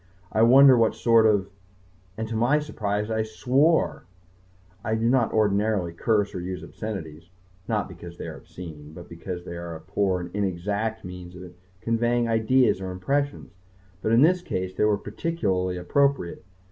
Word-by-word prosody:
I 110 - +1
wonder 130 +3 +8
what 115 -2 +2
sort 115 -2 +4
of... 100 -2 +1 0.7
and 110 0 -3
to 115 - -4
my 120 +7 +3
surprise 105 -8 -2
I 110 0 +1
swore! 130 +9 +1 0.8
I 110 +1 0
do 115 +1 0
not 120 -2 +2
ordinarily 105 -4 +1
curse 105 +3 0
or - - -4
use 90 +1 -5
obscenities 85 -6 -7 0.4
not - - 0
because 85 -1 -11
they - - -6
are - - -7
obscene 80 -4 -11
but 85 +2 -11
because 85 +1 -7
they 85 - -7
are 85 -1 -6
a - - -8
poor 95 +2 -1
and 90 0 -7
inexact 105 +3 -2
means 90 -1 -9
of 90 0 -10 0.3
conveying 120 +1 +1
ideas 115 -1 +2
or 95 - -4
impressions. 140 +11 -2 0.5
But 110 - 0
in 115 +4 +6
this 180 +3 +4
case 95 - -3
they 105 - +1
were 105 -1 +3
particularly 100 - -2
appropriate. 135 0 0
105 Hz, 165 wpm, -25 LUFS, 90-115 Hz, 0.8 s, wonder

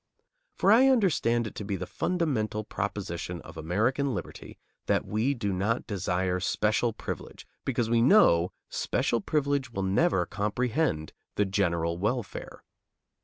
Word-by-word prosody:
For 195 - +3
I 250 +5 +7
understand 170 - +3
it 105 - -6
to - - -6
be 100 -1 -2
the 95 - -4
fundamental 120 - -1
proposition 95 -5 -4
of - - -12
American 115 - 0
liberty - - -7 0.3
that - - +1
we 115 +7 0
do 105 -5 -2
not 105 +6 0
desire 90 -2 -1
special 105 +5 +1
privilege, - - -7 0.2
because 120 -3 0
we 115 0 +3
know 105 - +5 0.2
special 115 - 0
privilege 140 +1 0
will 100 -4 -3
never 95 -1 +2
comprehend 105 - -1 0.2
the 105 - +2
general 85 -3 0
welfare. 110 +2 -3
105 Hz, 135 wpm, -28 LUFS, 95-130 Hz, 0.3 s, I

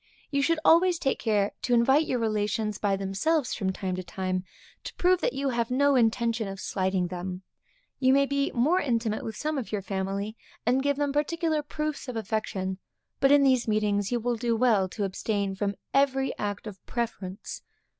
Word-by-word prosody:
You 280 -1 +1
should 330 +4 +2
always 345 +2 +5
take 270 - -1
care 210 -3 +1
to 245 - +2
invite 265 +6 +4
your 255 - 0
relations 215 -1 -1
by 200 -2 +1
themselves 210 +10 0
from 190 -3 -1
time 185 -1 -3
to 185 - -4
time, 185 0 -3 0.4
to - - -7
prove 365 0 +3
that - - 0
you 275 0 -1
have 235 -2 -1
no 280 +2 +3
intention 230 -2 +2
of 195 0 -6
slighting 185 -2 -1
them. 180 +1 -5 0.6
You 260 -1 +4
may 275 +1 +5
be 280 0 0
more 300 +10 +3
intimate 230 - -1
with 220 - -5
some 305 +2 -2
of 245 - -6
your 205 -2 -2
family, 195 +2 -3 0.3
and 250 +3 +3
give 285 0 +1
them 285 -1 0
particular 315 +1 0
proofs 300 0 -4
of 250 - -5
affection; 200 -3 -2 0.4
but 275 - +4
in 285 -1 +6
these 260 -3 +3
meetings 210 -1 +1
you 240 - +1
will 240 +1 -1
do 230 0 0
well 220 -6 +3
to 205 - -4
abstain 200 0 -1
from 200 +1 -2 0.2
every 270 -1 +2
act 205 0 -3
of 200 -3 -9
preference. 205 -5 -4
230 Hz, 190 wpm, -27 LUFS, 200-275 Hz, 0.6 s, in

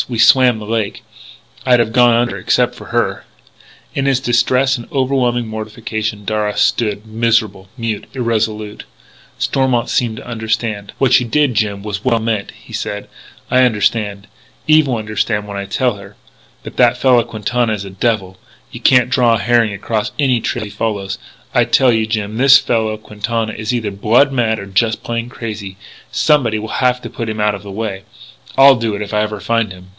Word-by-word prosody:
We 120 - -3
swam 125 +1 +5
the 110 - -8
lake.... 110 -2 -2 0.6
I'd 125 -2 +4
have 115 -1 0
gone 120 -1 +5
under 120 0 +1
except - - +1
for - - -12
her - - -1 0.3
" - - -27
In 135 0 0
his 135 -2 +2
distress 130 +1 +2
and 120 -3 -9
overwhelming 130 -3 0
mortification, 110 -1 -5
Darragh 105 -1 -1
stood 105 -2 +1
miserable, 110 -4 0
mute, 115 -3 -3
irresolute. 110 -3 -2 0.5
Stormont 130 -3 0
seemed 115 -3 0
to - - -10
understand: 110 -3 -3
"What 130 -2 +4
you 125 - -4
did, 145 +1 +2
Jim, 100 -2 -1
was 105 -1 -5
well 120 -3 +2
meant," 110 -3 -2
he - - -14
said. 105 0 -4 0.4
"I 130 - +5
understand. 105 -4 +1 0.4
Eve 155 -1 +5
will 125 - 0
understand 105 -1 -2
when 100 - -7
I 100 0 -4
tell 120 +2 0
her. 100 0 -13 0.5
But - - -10
that 125 0 +4
fellow 125 -2 +4
Quintana 115 +1 -1
is 100 -2 -4
a 95 - -8
devil. 95 -2 -1 0.3
You - - -8
can't 125 -1 +4
draw 120 -3 +4
a - - -2
herring 120 -2 +2
across 105 +2 -3
any 130 -5 +2
trail 120 0 -2
he 105 - -9
follows. 100 -4 -3 0.3
I - - +4
tell 130 -2 +4
you, 110 -1 0
Jim, 110 -1 -3
this 135 +2 +7
fellow 110 -5 -1
Quintana 110 +1 -3
is 110 +1 -3
either 115 -4 -2
blood 115 +8 +3
mad 115 -4 +1
or 100 - -7
just 110 +3 0
plain 115 0 -3
crazy. 105 -5 -7 0.3
Somebody 130 -8 +2
will 110 +4 -4
have 125 0 +2
to - - -6
put 115 -1 -5
him 110 0 -4
out 105 0 +2
of 100 - -6
the 100 - -11
way. 100 -2 -4 0.6
I'll 135 0 +8
do 115 -3 -2
it 100 - -5
if 105 +1 -6
I 105 - +2
ever 105 -1 -3
find 115 -1 0
him." 90 0 -12
110 Hz, 190 wpm, -17 LUFS, 105-120 Hz, 0.6 s, I'll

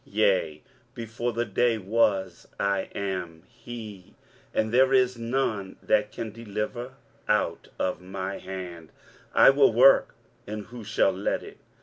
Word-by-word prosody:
23:043:013 - - -19
Yea, - - +2 0.3
before 120 0 -3
the 120 +1 -1
day 115 +2 +1
was 95 -3 0
I 100 -1 0
am 90 -4 -4
he; 115 -6 -10 0.4
and 110 0 0
there 130 +1 +5
is 125 -1 +3
none 115 -5 -2
that 105 0 +2
can 115 -2 -5
deliver 115 +3 -5 0.3
out - - 0
of 90 - -2
my 95 +1 -5
hand: 90 -4 -8 0.5
I - - +8
will 135 -2 +5
work, 130 +4 +5 0.3
and 105 0 -5
who 120 -1 -10
shall 100 -1 +2
let 95 +2 -2
it? - - -12
110 Hz, 140 wpm, -26 LUFS, 95-120 Hz, 0.5 s, I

